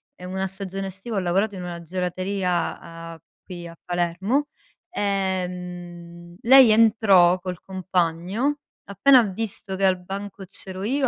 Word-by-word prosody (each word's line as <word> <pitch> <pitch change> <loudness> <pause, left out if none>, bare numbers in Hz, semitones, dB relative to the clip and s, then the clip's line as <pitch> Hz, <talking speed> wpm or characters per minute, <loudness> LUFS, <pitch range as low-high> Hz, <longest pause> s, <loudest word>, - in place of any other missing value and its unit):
ehm, 180 0 -9
una 190 0 -2
stagione 195 0 -5
estiva, 195 +4 -7
ho - - +3
lavorato 195 +3 0
in 180 - -6
una 170 -1 -6
gelateria, 180 +1 -2 0.3
a 165 - -15 0.2
qui 175 -2 -9
a 170 - -11
Palermo, 180 +11 -1 0.4
ehm, 180 - -4
lei 260 0 +8
entrò 200 -5 +5
col 180 -1 -6
compagno, 185 - -1 0.3
appena 250 +7 +5
ha - - +4
visto 195 -1 -4
che 195 - +1
al 185 -1 +3
banco 195 +1 -7
c'ero 190 0 0
io, 265 +4 +1
190 Hz, 140 wpm, -23 LUFS, 180-200 Hz, 0.4 s, lei